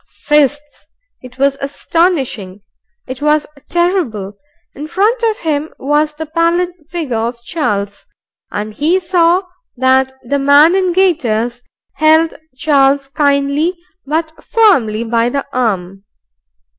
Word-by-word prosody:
Fists! 295 0 -1 0.3
It 255 0 -13
was 275 0 +1
astonishing. 275 - -1 0.4
It 260 +1 -7
was 300 0 +2 0.2
terrible! 325 - -1 0.4
In 295 +2 -7
front 420 +8 +1
of 450 -2 +1
him 310 -1 -2
was 295 +2 0
the 315 +1 -5
pallid 335 +3 +1 0.2
figure 310 -9 -3
of 235 +1 -3
Charles, 205 -10 -3 0.4
and 210 +1 -4
he 320 - +1
saw 350 0 +2 0.3
that 260 +1 +2
the 280 +4 -1
man 285 +4 +5
in 375 -2 +1
gaiters 245 - 0 0.4
held 315 +1 +4 0.2
Charles 275 -1 +2
kindly 285 +4 +1 0.3
but 315 +2 -2
firmly 260 - +2
by 230 +1 +1
the 280 +2 -3
arm. 195 -6 -2
290 Hz, 120 wpm, -15 LUFS, 250-335 Hz, 0.4 s, man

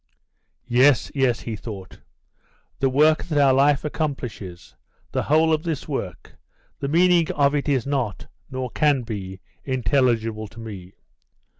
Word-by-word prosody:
"Yes, 125 +2 +4
yes," 130 -4 +1
he 115 - -5
thought. 100 -3 -9 0.8
"The 135 - +2
work 155 +4 +3
that 155 -4 -2
our 140 -2 +5
life 140 +2 +3
accomplishes, 125 - -5 0.4
the - - 0
whole 160 +2 +3
of 155 - +1
this 160 -4 -4
work, 115 - -6 0.4
the 140 - -3
meaning 170 +2 +3
of 140 -1 +3
it 145 0 -1
is 130 -5 +1
not, 135 -8 -2 0.2
nor 130 -2 -4
can 145 -4 +2
be, 95 -4 -6 0.2
intelligible 115 -4 0
to 115 - -14
me. 100 -5 -9
130 Hz, 140 wpm, -23 LUFS, 110-145 Hz, 0.8 s, our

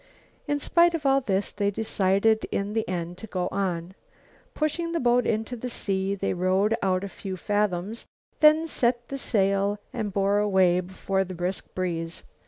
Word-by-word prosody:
In 290 0 0
spite 340 +3 +4
of 305 -3 -5
all 275 0 +4
this, 200 -5 -1
they 205 -1 0
decided 205 +1 +1
in 200 +1 -2
the 220 -3 -1
end 175 -1 -4
to 220 - -8
go 180 -3 -2
on. 180 -2 -2 0.6
Pushing 335 +2 -1
the 335 - 0
boat 245 -2 +3
into 225 +3 -1
the 250 +1 -5
sea 195 -3 -1
they 200 - -1
rowed 190 +4 +2
out 185 -1 +1
a - - -3
few 190 -1 -6
fathoms, 205 +1 -1 0.3
then 310 +1 +6
set 240 -5 0
the 275 - -3
sail 200 -2 +1 0.2
and 210 -2 -3
bore 200 +1 +2
away 190 -4 +3
before 190 +1 -1
the 185 -1 -7
brisk 180 +2 -3
breeze. 170 -2 -3
200 Hz, 175 wpm, -26 LUFS, 185-235 Hz, 0.6 s, then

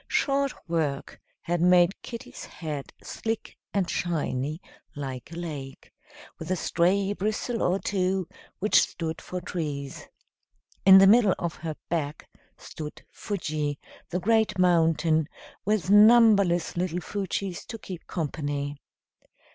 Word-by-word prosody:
Short 275 -1 +1 0.2
work 155 -5 -2 0.2
had 175 0 -1
made 180 +1 +4
kitty's 235 -1 -8
head 150 -5 -6
slick 225 -1 -4 0.2
and 195 -3 0
shiny, 155 -4 -2 0.4
like 135 -1 -6
a - - -8
lake, 150 -6 -7 0.5
with 160 - -7
a 185 - +2
stray 190 +4 +1
bristle 215 +4 -2
or 180 +2 +2
two, 190 -2 -1 0.3
which 210 +3 +4
stood 165 -1 -3
for 180 - -5
trees. 145 -6 -5 0.8
In 190 0 +11
the 195 - +8
middle 210 -1 +6
of 170 -2 -4
her 155 -1 -5
back 155 -3 -3 0.3
stood 150 -1 -9
Fuji, 155 -7 -3 0.3
the 180 - -1
great 220 +1 +2
mountain, 165 -3 +3 0.4
with 200 -2 +1
numberless 205 -5 +6
little 175 0 -1
Fujis 195 -1 -4
to 230 - -6
keep 185 -5 -9
company. 145 -3 -3
175 Hz, 125 wpm, -27 LUFS, 155-200 Hz, 0.8 s, In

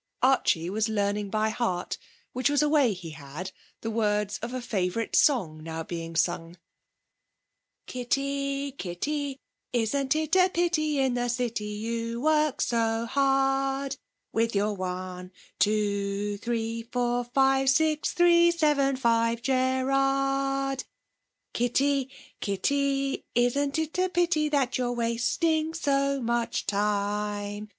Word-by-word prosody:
Archie 255 -10 +3
was 215 +2 0
learning 205 -1 -1
by 215 +1 +1
heart 215 -6 -2 0.3
which 255 +3 +1
was 290 +1 +3
a - - +3
way 290 -6 +4
he 175 -4 -7
had 155 +5 -7 0.3
the 225 - -3
words 210 -2 0
of 235 +2 -5
a 255 - -3
favourite 220 -2 -2
song 180 - +3
now 160 0 -5
being 165 0 -6
sung 170 +1 -1 1.3
'Kitty, 275 +2 -2
Kitty, 275 +7 -3 0.3
isn't 265 +4 +1
it 310 +2 0
a 370 0 +5
pity, 330 -4 +1
In 265 -2 +2
the 245 0 -1
city 240 -3 -2
you 230 +2 -3
work 305 0 +2
so 230 -1 +1
hard, 270 +1 +1 0.4
With 230 0 +1
your 205 +1 +1
one, 185 -1 -5 0.3
two, 205 -1 0
three, 230 0 -2
four, 245 0 0
five, 270 +2 +3
Six, 310 +2 +2
three, 345 -1 +5
seven, 295 -5 +2
five, 230 -2 +1
Cerrard? 270 +1 +1 0.7
Kitty, 270 +3 +1 0.3
Kitty, 275 +7 0
isn't 280 +5 +2
it 320 +2 -2
a 370 0 +2
pity, 340 -4 +1
That 270 -4 +1
you're 245 -1 0
wasting 310 +8 0
so 275 -3 +1
much 235 -1 -1
time? 205 0 -1
245 Hz, 125 wpm, -27 LUFS, 210-275 Hz, 1.3 s, a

